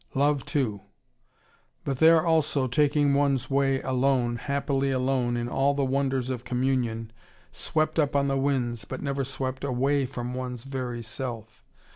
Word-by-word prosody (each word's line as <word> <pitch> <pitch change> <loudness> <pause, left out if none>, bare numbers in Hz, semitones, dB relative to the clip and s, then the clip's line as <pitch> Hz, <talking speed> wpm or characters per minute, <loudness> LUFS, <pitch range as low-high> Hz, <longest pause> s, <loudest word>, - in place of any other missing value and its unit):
Love 145 0 +2
too. 110 -9 -1 1.0
But 135 -2 -3
there 160 0 +6
also, 155 -5 +2
taking 145 +2 +2
one's 140 -2 +1
way 135 -1 +2
alone, 130 -2 +1
happily 140 +1 -1
alone 130 -2 0
in 120 0 -2
all 135 +3 +1
the 140 -1 +1
wonders 135 -1 0
of 125 -2 -4
communion, 125 -3 -1 0.4
swept 155 +1 -1
up 145 -2 +1
on 140 0 +3
the 135 - +1
winds, 130 -5 0
but 100 - -7
never 140 -1 -1
swept 130 0 -4
away 135 +1 +1
from 125 -2 -5
one's 125 -2 -5
very 125 -3 -4
self. 115 -1 -6
135 Hz, 150 wpm, -27 LUFS, 125-140 Hz, 1.0 s, there